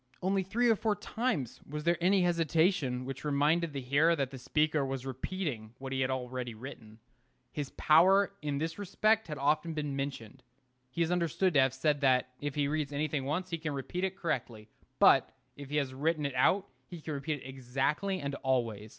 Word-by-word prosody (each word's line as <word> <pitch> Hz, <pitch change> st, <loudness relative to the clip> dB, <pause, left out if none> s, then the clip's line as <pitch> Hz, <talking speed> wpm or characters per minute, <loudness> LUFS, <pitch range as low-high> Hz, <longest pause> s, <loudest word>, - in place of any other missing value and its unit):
Only 195 Hz, +1 st, +2 dB
three 225 Hz, +6 st, +1 dB
or 225 Hz, -, +5 dB
four 215 Hz, 0 st, 0 dB
times 210 Hz, -, -2 dB
was 150 Hz, +1 st, -4 dB
there 170 Hz, +1 st, +2 dB
any 185 Hz, +1 st, +4 dB
hesitation 165 Hz, -6 st, +1 dB
which 135 Hz, 0 st, -6 dB
reminded 150 Hz, +3 st, +2 dB
the 140 Hz, -1 st, -4 dB
hearer 145 Hz, +6 st, +3 dB
that 135 Hz, -4 st, -2 dB
the 135 Hz, -, -8 dB
speaker 150 Hz, +2 st, +1 dB
was 135 Hz, -1 st, -4 dB
repeating 130 Hz, -, -4 dB
what 135 Hz, 0 st, -6 dB
he 130 Hz, -, 0 dB
had 130 Hz, -, +1 dB
already 125 Hz, -2 st, -3 dB
written. 110 Hz, -3 st, -10 dB, 0.5 s
His 145 Hz, -3 st, -4 dB
power 190 Hz, +6 st, +5 dB
in 145 Hz, -2 st, -2 dB
this 165 Hz, +5 st, -3 dB
respect 215 Hz, +3 st, +1 dB
has 150 Hz, -, -4 dB
been 140 Hz, -, -7 dB, 0.3 s
often 145 Hz, -2 st, -2 dB
mentioned. 135 Hz, -3 st, -5 dB, 0.5 s
He 165 Hz, +7 st, 0 dB
is 165 Hz, -, -1 dB
understood 180 Hz, +1 st, +1 dB
to 145 Hz, -, +5 dB
have 130 Hz, -1 st, +2 dB
said 145 Hz, +1 st, +1 dB
that, 130 Hz, -2 st, +3 dB
if 145 Hz, -2 st, -4 dB
he 145 Hz, -1 st, +1 dB
reads 150 Hz, -1 st, -1 dB
anything 145 Hz, -1 st, -1 dB
once, 180 Hz, +6 st, -2 dB
he 165 Hz, -, -2 dB
can 155 Hz, -2 st, -3 dB
repeat 175 Hz, +7 st, -4 dB
it 190 Hz, -1 st, -1 dB
correctly; 120 Hz, -, -3 dB, 0.3 s
but -, -, +6 dB, 0.3 s
if 140 Hz, -1 st, -9 dB
he 150 Hz, -, -3 dB
has 135 Hz, -3 st, -1 dB
written 150 Hz, +2 st, 0 dB
it 140 Hz, -, -2 dB
out, 180 Hz, +10 st, +3 dB, 0.2 s
he 175 Hz, -, -8 dB
can 155 Hz, 0 st, -5 dB
repeat 145 Hz, +1 st, -3 dB
it -, -, -9 dB
exactly 135 Hz, +9 st, -1 dB
and 140 Hz, 0 st, -3 dB
always. 115 Hz, -5 st, -1 dB
145 Hz, 200 wpm, -31 LUFS, 130-170 Hz, 0.5 s, but